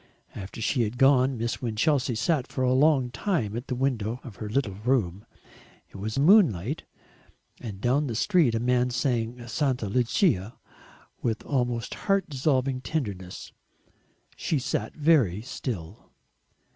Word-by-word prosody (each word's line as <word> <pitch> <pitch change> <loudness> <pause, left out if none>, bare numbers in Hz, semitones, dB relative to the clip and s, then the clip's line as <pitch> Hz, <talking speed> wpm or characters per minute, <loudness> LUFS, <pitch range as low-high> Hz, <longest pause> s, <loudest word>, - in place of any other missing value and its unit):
After 100 +3 -8
she 125 +3 +1
had 115 +2 -2
gone 135 -1 +4
Miss 115 +1 -3
Winchelsea 125 +2 +1
sat 140 +3 0
for 130 - -3
a 125 0 +3
long 135 -2 +3
time 120 - -1
at 120 +4 -5
the 125 - -2
window 120 -3 -1
of 115 -6 -10
her 105 - -5
little 110 -3 0
room. 105 -2 -1 0.6
It - - -10
was 110 +5 -4
moonlight, 145 - +4 0.7
and 105 -6 -7
down 135 +7 +1
the 115 - -3
street 155 - +3
a - - +1
man 125 +1 +2
sang 120 -1 -2
"Santa 130 -3 -1
Lucia" 115 - +1 0.6
with 115 -2 -2
almost 120 -4 -1
heart 195 -1 0
dissolving 130 -2 0
tenderness.... 100 - -4 0.8
She 155 - -1
sat 120 -4 -3
very 140 - +3
still. 105 -7 -6
125 Hz, 140 wpm, -26 LUFS, 110-135 Hz, 0.8 s, gone